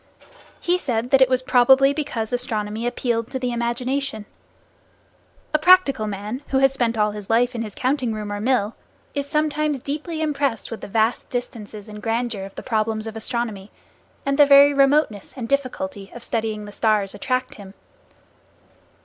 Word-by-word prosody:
He 355 +1 +1
said 245 -5 -2
that 270 -1 +5
it 260 - +6
was 255 0 +1
probably 265 +2 +5
because 245 -7 -3
astronomy 225 -2 -2
appealed 235 -2 -1
to 265 - -3
the 250 -1 -2
imagination. 240 0 -2 1.3
A 305 - +3
practical 305 -10 +5
man, 210 +5 -5
who 265 - 0
has 270 0 +4
spent 235 -3 0
all 210 0 +2
his 205 -1 -9
life 240 +3 +3
in 235 - -3
his 215 -3 -6
counting 255 -2 0
room 210 -1 -4
or 205 - -4
mill, 230 -3 +1 0.4
is 280 -1 -3
sometimes 300 -2 0
deeply 310 +3 -4
impressed 285 -7 -1
with 225 - -6
the - - -7
vast 220 +3 0
distances 220 -4 -6
and 210 0 -9
grandeur 225 -2 -2
of 195 - -12
the - - -7
problems 220 -2 -1
of 225 0 -6
astronomy, 220 -3 -3 0.6
and 275 +1 0
the 290 - +8
very 280 0 +8
remoteness 275 -7 +2
and 235 -3 -4
difficulty 280 -5 -2
of 240 - -8
studying 220 -2 -2
the 205 - -9
stars 210 -2 +1
attract 255 -1 -2
him. 200 -1 -12
240 Hz, 170 wpm, -22 LUFS, 215-275 Hz, 1.3 s, the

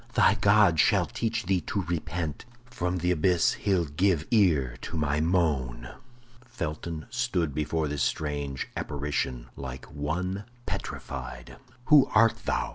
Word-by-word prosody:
Thy - - +5
God 100 -5 +4
shall - - +4
teach 115 -2 -2
thee 90 -1 +1
to 100 +5 -2
repent! 85 - -3 0.2
From 90 -8 -2
th' 90 +1 +2
abyss 90 +1 +3
he'll 95 -4 +1
give 80 +2 +1
ear 80 - +3
to - - -5
my 75 -1 0
moan." 75 -8 0 0.5
Felton 85 -9 -5
stood 105 - 0
before 75 +1 -1
this 75 -1 -3
strange 70 -3 -2
apparition 70 -4 -2
like 65 -2 -7
one 90 +7 -3 0.2
petrified. - - -6 0.3
"Who 145 -2 +6
art 115 +1 +4
thou? - - 0
80 Hz, 130 wpm, -27 LUFS, 75-95 Hz, 0.5 s, Who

